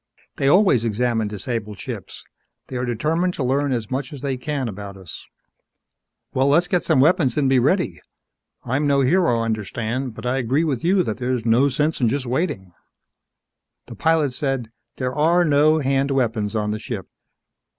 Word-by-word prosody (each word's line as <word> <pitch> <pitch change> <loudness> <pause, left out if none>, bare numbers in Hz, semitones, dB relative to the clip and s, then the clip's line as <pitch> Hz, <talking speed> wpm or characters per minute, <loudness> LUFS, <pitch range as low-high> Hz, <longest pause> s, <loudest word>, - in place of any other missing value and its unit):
"They 135 - +1
always 175 - +4
examine 115 0 0
disabled 105 0 -4
ships. - - -7 0.5
They 130 - -4
are 125 - -1
determined 160 +10 0
to 140 - -2
learn 140 +2 +1
as 115 -3 -3
much 130 0 -3
as 145 -4 -9
they 135 -2 -1
can 135 0 -3
about 100 -2 -7
us." 95 -4 -11 1.1
"Well, 130 +1 +2
let's 170 +5 +3
get 180 -3 +1
some 160 -5 +2
weapons 140 -3 +3
and 145 -2 +2
be 130 -1 +4
ready. 175 +9 +1 0.6
I'm 145 +4 0
no 140 -1 +3
hero, 135 -5 +2
understand. 115 +3 -3
But 115 - -9
I 125 +2 0
agree 130 +6 +1
with 140 -7 -2
you 185 +2 +3
that 110 - -3
there's 125 -2 -2
no 120 +5 +4
sense 150 +3 -1
in 120 - +3
just 135 +2 -2
waiting." 125 - -2 1.1
The - - -10
pilot 160 -4 +1
said: 130 -4 -2 0.3
"There 130 -1 -2
are 170 +5 +3
no 150 +1 +4
hand 135 0 +1
weapons 115 -6 0
on 105 -1 0
the 110 - -3
ship. 110 -5 -6
130 Hz, 175 wpm, -22 LUFS, 115-150 Hz, 1.1 s, always